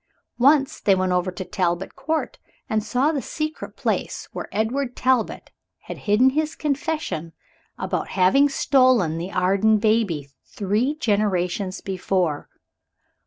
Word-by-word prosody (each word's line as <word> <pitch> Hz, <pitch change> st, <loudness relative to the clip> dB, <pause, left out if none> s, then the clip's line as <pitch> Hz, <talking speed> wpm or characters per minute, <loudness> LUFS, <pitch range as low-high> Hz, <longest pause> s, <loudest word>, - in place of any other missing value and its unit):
Once 275 Hz, +2 st, +4 dB
they 195 Hz, -, +3 dB
went 185 Hz, 0 st, 0 dB
over 180 Hz, +1 st, +1 dB
to 185 Hz, +1 st, -6 dB
Talbot 175 Hz, 0 st, -2 dB
Court, 315 Hz, 0 st, -3 dB, 0.3 s
and 215 Hz, -1 st, 0 dB
saw 255 Hz, +7 st, +1 dB
the 290 Hz, -4 st, -2 dB
secret 310 Hz, +3 st, -5 dB
place -, -, -2 dB
where -, -, -6 dB
Edward 245 Hz, +5 st, -1 dB
Talbot 255 Hz, -3 st, 0 dB, 0.3 s
had -, -, -8 dB
hidden 245 Hz, +6 st, +5 dB
his 310 Hz, +2 st, -1 dB
confession 285 Hz, -, -2 dB, 0.4 s
about -, -, -2 dB
having 275 Hz, +11 st, +5 dB
stolen 255 Hz, -, +3 dB
the 180 Hz, +3 st, -5 dB
Arden 195 Hz, +4 st, +3 dB
baby, 210 Hz, -10 st, +1 dB
three 215 Hz, +9 st, -1 dB
generations 200 Hz, -, -1 dB
before. 185 Hz, -5 st, -1 dB
215 Hz, 125 wpm, -23 LUFS, 185-270 Hz, 0.4 s, hidden